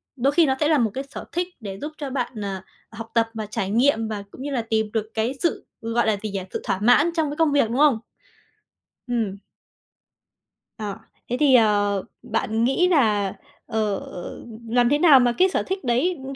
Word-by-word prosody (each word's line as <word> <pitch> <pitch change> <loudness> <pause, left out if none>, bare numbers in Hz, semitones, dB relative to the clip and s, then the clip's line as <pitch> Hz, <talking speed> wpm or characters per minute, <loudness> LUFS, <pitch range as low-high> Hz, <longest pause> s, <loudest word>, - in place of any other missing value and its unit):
Đôi 270 +2 +2
khi 335 0 +5
nó 265 -2 +1
sẽ 300 - +2
là 310 -1 +4
một 225 -4 +1
cái 270 - -3
sở - - -8
thích 350 +1 -1
để 195 -3 -7
giúp 300 - -4
cho 285 -3 -5
bạn, 255 -1 -3
ờ, 195 -2 -4 0.3
học 225 0 -9
tập 230 -1 +3
và 220 -1 -4
trải 200 -2 -3
nghiệm, 225 +1 +2
và 210 -2 -4
cũng - - -11
như 285 +1 -4
là 255 -4 0
tìm 220 -1 0
được 220 -1 -2
cái 225 +3 0
sự, 340 - -1 0.2
gọi 230 +1 0
là 215 -2 +2
gì 215 - -3
nhỉ? 195 - -3
Sự - - -3
thỏa 190 - -1
mãn 245 +9 +5
trong 315 -3 +1
cái 295 - -6
công 320 -2 +3
việc, 280 -6 +3
đúng 240 - -2
không? 285 -6 +4 1.1
Ừm. 225 -5 -2 1.4
À, 210 -3 -4 0.3
thế 245 - -1
thì, 280 -4 +5
ờ, 205 -3 +3 0.2
bạn 225 0 -1
nghĩ 270 +9 +3
là, 210 - +2 0.3
ờ, 215 -2 -1
ừm, 225 +5 -9
làm 240 +1 +3
thế 290 +2 +2
nào 305 -6 +7
mà 245 -1 +3
cái 375 +1 +5
sở - - 0
thích 380 -2 -4
đấy, 260 +9 +1
ưm, 270 +1 -6
235 Hz, 215 wpm, -23 LUFS, 215-280 Hz, 1.4 s, nào